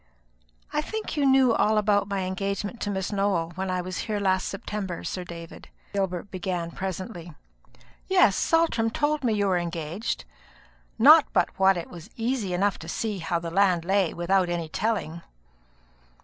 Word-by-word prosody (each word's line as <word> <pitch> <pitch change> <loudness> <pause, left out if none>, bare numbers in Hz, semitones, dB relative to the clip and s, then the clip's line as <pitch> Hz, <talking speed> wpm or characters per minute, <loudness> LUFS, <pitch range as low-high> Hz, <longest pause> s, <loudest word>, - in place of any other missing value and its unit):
"I 300 - +1
think 440 +5 -5
you 285 -2 +2
knew 265 -3 +5
all 215 -1 +2
about 205 -1 +2
my 200 -1 -1
engagement 200 +4 -3
to - - -1
Miss 190 -1 -2
Nowell, 195 -5 0
when 190 +2 -3
I 185 0 0
was 185 +1 -5
here 215 -2 -2
last 190 -2 +1
September, 195 -3 -5
Sir 180 - -4
David," 170 -1 -10 0.2
Gilbert 190 -1 -2
began 180 -2 -3
presently. 185 -2 -6 0.7
"Yes, 365 - +5
Saltram 325 -9 +2
told 295 +5 0
me 235 -3 +2
you 205 -1 +1
were 185 -2 +2
engaged; 170 +4 -4 0.7
not 300 +6 +8
but - - +3
what 190 -1 +5
it 170 - -6
was 170 -2 -10
easy 230 -4 -1
enough 195 +2 +1
to 160 - -9
see 210 +1 -2
how 170 +1 -1
the 170 0 -5
land 180 -2 +3
lay, 190 -2 +2
without 180 +1 +1
any 170 -2 -2
telling." 170 -4 -2
195 Hz, 165 wpm, -26 LUFS, 175-215 Hz, 0.7 s, not